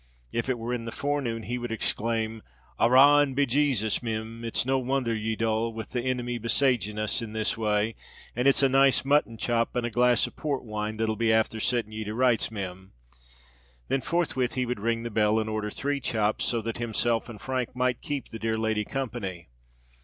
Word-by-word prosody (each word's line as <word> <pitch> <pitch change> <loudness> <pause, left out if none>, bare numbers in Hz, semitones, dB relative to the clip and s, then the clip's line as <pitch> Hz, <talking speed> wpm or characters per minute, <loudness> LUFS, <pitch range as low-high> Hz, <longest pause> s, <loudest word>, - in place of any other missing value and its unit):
If 115 +3 -2
it 130 - +1
were 115 +2 -3
in 120 -2 -3
the 115 - -5
forenoon, 135 -6 -2
he 125 +3 -3
would 120 -1 -5
exclaim, 115 0 -1 0.4
"Arrah 135 +5 +7
and 140 -3 0
be 140 +1 +3
Jasus, 125 -5 +1
Mim, 115 0 -4
it's 115 +1 0
no 135 +1 +2
wonther 130 -2 0
ye're 110 0 -2
dull, 115 +1 0
with 110 -1 -7
the 125 - -1
inimy 125 -1 -2
besaging 115 -2 +1
us 110 +3 -1
in 110 -2 -6
this 110 0 0
way: 110 0 0 0.4
and 125 +3 +1
it's 140 0 +4
a - - +7
nice 135 0 +4
mutton 140 -5 +2
chop 115 0 0
and 120 -1 0
a 120 - -3
glass 120 +1 +4
of - - -9
Port 145 -3 -2
wine 110 0 -3
that'll 110 0 0
be 115 +1 +1
afther 110 0 +2
sitting 115 -1 0
ye 110 0 -4
to 105 +1 -4
rights, 125 -2 +3
Mim." 95 -3 -7 1.0
Then 135 - +1
forthwith 150 -7 0
he 130 -1 0
would 125 -3 -3
ring 115 +2 -1
the 120 - -4
bell, 105 0 +3
and 110 - -2
order 110 -1 -2
three 140 +6 -2
chops, 110 -4 0
so 115 -2 0
that 115 +1 -4
himself 115 0 0
and 110 -3 -9
Frank 130 -2 -3
might 125 -1 0
keep 145 -2 -4
the 115 - -7
dear 110 0 -1
lady 110 -1 0
company. 105 - -4
115 Hz, 205 wpm, -27 LUFS, 110-125 Hz, 1.0 s, Arrah